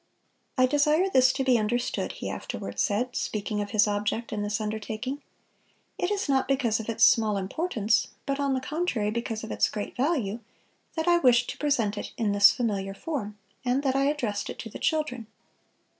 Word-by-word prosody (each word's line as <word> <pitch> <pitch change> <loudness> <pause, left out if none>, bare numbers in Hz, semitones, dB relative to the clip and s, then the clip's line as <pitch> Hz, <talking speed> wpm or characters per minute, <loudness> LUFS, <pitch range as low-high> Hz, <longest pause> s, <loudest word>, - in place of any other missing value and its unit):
"I 255 - +6
desire 300 +7 +2
this 260 -3 +5
to 270 - -1
be 255 -3 +4
understood," 240 +3 -1
he - - -6
afterward - - -5
said, 245 +4 0
speaking 210 0 -2
of 205 - -4
his 215 0 +4
object 210 +3 -2
in 210 - -2
this 205 0 -1
undertaking, 220 +5 -4 0.8
"it 360 - 0
is 410 -3 -1
not 270 -2 +2
because 255 -5 +1
of 225 - -6
its 230 - +1
small 215 -3 +5
importance, 220 - 0 0.2
but 275 0 -1
on 280 -1 +1
the 260 - -2
contrary 260 -8 -1
because 225 -1 -3
of 220 - -6
its - - +2
great 210 -1 -5
value, 245 - 0 0.6
that 320 0 -2
I 345 0 +5
wished 245 -4 +4
to - - -10
present 230 -9 +1
it - - -7
in 220 -3 +1
this 205 0 +7
familiar 200 -5 -2
form, 210 -7 -4 0.3
and 255 +2 +1
that 265 -2 +1
I 275 0 +2
addressed 245 -9 -1
it - - -6
to 225 - -9
the - - -8
children. 300 -8 -1
240 Hz, 190 wpm, -27 LUFS, 210-275 Hz, 0.8 s, this